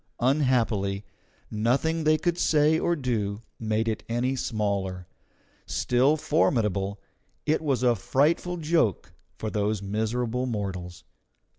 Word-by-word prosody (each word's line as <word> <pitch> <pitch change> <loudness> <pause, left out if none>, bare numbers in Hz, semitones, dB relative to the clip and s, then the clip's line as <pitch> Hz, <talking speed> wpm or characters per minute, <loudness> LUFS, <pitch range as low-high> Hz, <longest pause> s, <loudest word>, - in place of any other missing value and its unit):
Unhappily, 120 -7 +1 0.5
nothing 140 +9 +1
they 155 0 +5
could 175 +2 -1
say 155 +1 +3
or 170 - +1
do 115 -7 -2 0.2
made 110 0 0
it 110 -1 -1
any 125 +3 0
smaller; 100 -6 -2 0.6
still 130 +5 +2
formidable, 105 - +1 0.5
it 155 +1 +1
was 135 -6 0
a 125 -1 +5
frightful 150 +9 +1
joke 160 - 0 0.2
for 110 - -4
those 105 -1 -1
miserable 115 +5 -1
mortals. 95 -6 -4
120 Hz, 115 wpm, -26 LUFS, 105-145 Hz, 0.6 s, they